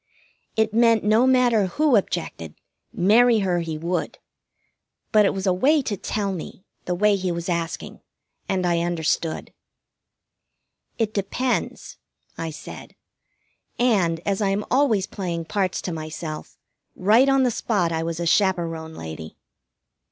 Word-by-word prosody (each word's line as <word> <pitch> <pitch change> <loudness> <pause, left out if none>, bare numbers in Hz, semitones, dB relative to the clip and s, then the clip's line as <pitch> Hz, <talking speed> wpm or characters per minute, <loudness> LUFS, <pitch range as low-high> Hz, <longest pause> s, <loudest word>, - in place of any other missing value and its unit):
It 220 -1 +1
meant 230 -1 +4
no 220 +5 +4
matter 245 -6 +3
who 290 - +2
objected, 160 - -2 0.4
marry 225 +4 +4
her 175 -2 +1
he 165 -2 -4
would; 170 +3 -3 0.9
but 210 -1 +5
it - - 0
was 190 0 -3
a 185 - +3
way 280 +10 +3
to 215 - -2
tell 200 +1 -2
me 185 +2 -8 0.2
the 180 - -1
way 205 +2 +3
he 185 -2 -2
was 170 0 -4
asking, 170 -2 -3 0.5
and 185 -2 0
I 170 -1 +2
understood. 165 -1 -2 1.4
"It 220 -2 -1
depends," 235 +6 -2 0.4
I 165 - -4
said, 155 - -10 0.8
and, 190 -9 +2
as 200 0 0
I 200 - +2
am 200 +2 -1
always 245 -8 +3
playing 170 -4 -4
parts 195 0 -1
to 180 - -3
myself, 155 0 -7 0.4
right 225 +8 +4
on 270 -1 +4
the 250 - +2
spot 200 -7 0
I 160 0 -1
was 165 0 -3
a 170 - -2
chaperon 165 -4 0
lady. 80 0 -8
190 Hz, 145 wpm, -23 LUFS, 170-220 Hz, 1.4 s, but